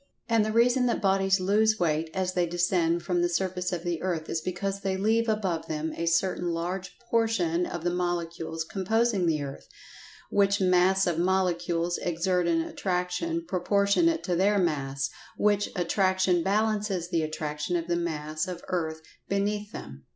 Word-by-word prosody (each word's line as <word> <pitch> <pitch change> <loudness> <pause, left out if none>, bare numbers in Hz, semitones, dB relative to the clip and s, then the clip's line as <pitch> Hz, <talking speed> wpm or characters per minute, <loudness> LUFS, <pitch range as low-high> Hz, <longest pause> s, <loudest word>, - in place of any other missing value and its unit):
And 230 -2 +3
the 215 - -1
reason 245 +3 +3
that 235 - 0
bodies 195 -1 +2
"lose 215 +3 +2
weight" 160 -2 0
as 185 0 -1
they 180 -1 +1
descend 175 -1 +1
from 180 -2 0
the 175 - +2
surface 180 +1 -1
of 175 -2 -3
the 175 -2 -2
earth 170 -4 -2
is 160 - -1
because 195 +3 -3
they 190 -1 -1
leave 225 +3 +2
"above" 190 -7 -1
them 155 0 -3
a 170 - -3
certain 175 +1 +1
large 180 +2 -4
portion 220 -8 0
of 170 - -5
the 175 - +1
molecules 170 -2 -2
composing 210 +1 +1
the 155 -3 +1
earth, 140 -1 -8 0.6
which 200 0 +3
mass 185 +1 +4
of 170 -2 0
molecules 175 -2 0
exert 180 +1 0
an 165 -1 +2
attraction 185 - -2
proportionate 200 - +2
to 180 - 0
their 200 +4 +3
mass, 140 -7 -1 0.3
which 205 -1 +2
attraction 185 0 +2
balances 205 -2 0
the 170 -3 +1
attraction 155 +1 -3
of 170 -1 -1
the 175 - +1
mass 155 -2 -2
of 180 -1 -6
earth 160 -3 -2 0.3
"beneath 205 +1 -1
them." 70 - -9
180 Hz, 165 wpm, -27 LUFS, 170-200 Hz, 0.6 s, mass